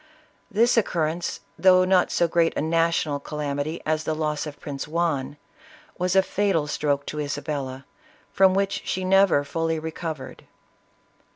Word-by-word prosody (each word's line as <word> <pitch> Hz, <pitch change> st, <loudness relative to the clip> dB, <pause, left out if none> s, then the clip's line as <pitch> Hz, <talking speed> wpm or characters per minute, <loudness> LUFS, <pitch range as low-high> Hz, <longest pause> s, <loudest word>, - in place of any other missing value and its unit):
This 235 Hz, +4 st, +3 dB
occurrence, 170 Hz, -5 st, -1 dB, 0.2 s
though 185 Hz, -1 st, +6 dB
not 185 Hz, -1 st, +3 dB
so 170 Hz, -, +2 dB
great 165 Hz, 0 st, +1 dB
a -, -, +1 dB
national 165 Hz, -2 st, +1 dB
calam 145 Hz, -1 st, -4 dB
ity 155 Hz, +4 st, -4 dB
as 155 Hz, 0 st, 0 dB
the 155 Hz, -, -2 dB
loss 155 Hz, 0 st, -2 dB
of 145 Hz, -, -9 dB
Prince 140 Hz, -1 st, -6 dB
Juan, 155 Hz, -4 st, -1 dB, 0.6 s
was 180 Hz, +1 st, 0 dB
a 190 Hz, -, +6 dB
fatal 195 Hz, -6 st, 0 dB
stroke 145 Hz, -1 st, -1 dB
to 150 Hz, -, -5 dB
Isa 145 Hz, 0 st, -3 dB
bella, 135 Hz, -3 st, -4 dB, 0.5 s
from 190 Hz, -1 st, +5 dB
which 195 Hz, 0 st, 0 dB
she 185 Hz, 0 st, -2 dB
never 190 Hz, -6 st, +4 dB
fully 165 Hz, +3 st, -1 dB
recovered. 160 Hz, -3 st, -6 dB
160 Hz, 155 wpm, -24 LUFS, 145-180 Hz, 0.6 s, though